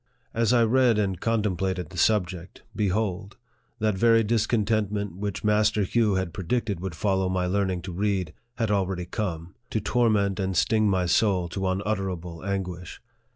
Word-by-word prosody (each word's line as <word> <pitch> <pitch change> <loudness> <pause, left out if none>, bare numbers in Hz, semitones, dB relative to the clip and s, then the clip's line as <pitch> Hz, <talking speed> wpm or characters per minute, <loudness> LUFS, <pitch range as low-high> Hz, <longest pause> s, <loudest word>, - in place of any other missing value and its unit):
As 115 -1 +2
I 120 -2 +5
read 120 0 +3
and 95 -4 0
contemplated 95 -6 -1
the 90 - -9
subject, 90 -4 0
be 105 -2 +1
hold! 100 0 -2 0.4
that 110 -2 0
very 115 +3 +4
discontentment 105 -3 0
which 100 +1 -4
Master 105 0 +2
Hugh 105 +1 +2
had 95 -3 -2
predicted 100 +1 -2
would 90 -2 -5
follow 95 0 0
my 90 -1 0
learning 95 -1 -1
to 90 - -6
read 95 -3 -1 0.2
had 115 -3 -1
already 95 -3 0
come, 90 -3 -4 0.2
to 110 - -1
torment 105 -3 +1
and 95 -2 -1
sting 110 +1 +3
my 95 -2 +1
soul 90 0 +2
to 95 +2 -2
unutterable 95 -3 -3
anguish. 90 -3 -4
100 Hz, 155 wpm, -26 LUFS, 90-110 Hz, 0.4 s, I